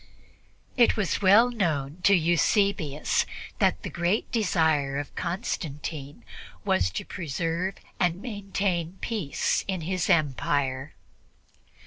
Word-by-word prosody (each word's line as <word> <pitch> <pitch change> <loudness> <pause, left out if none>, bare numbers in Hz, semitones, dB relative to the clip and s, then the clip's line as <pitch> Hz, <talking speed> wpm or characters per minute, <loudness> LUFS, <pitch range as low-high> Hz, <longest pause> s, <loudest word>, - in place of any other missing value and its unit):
It 240 -2 +5
was 205 -2 0
well 210 +6 +6
known 160 - -1
to 200 - +7
Eusebius 170 -2 +2 0.3
that 90 +2 +2
the - - -4
great 175 +5 0
desire 160 - +1
of 145 0 -5
Constantine 150 - -4 0.4
was 90 0 +2
to 95 - -5
preserve 170 +3 -2 0.2
and 175 -1 +1
maintain 195 -5 -2
peace 205 -11 -1
in 190 -3 -2
his 180 +2 -1
empire. 140 -2 +1
170 Hz, 105 wpm, -27 LUFS, 145-195 Hz, 0.4 s, to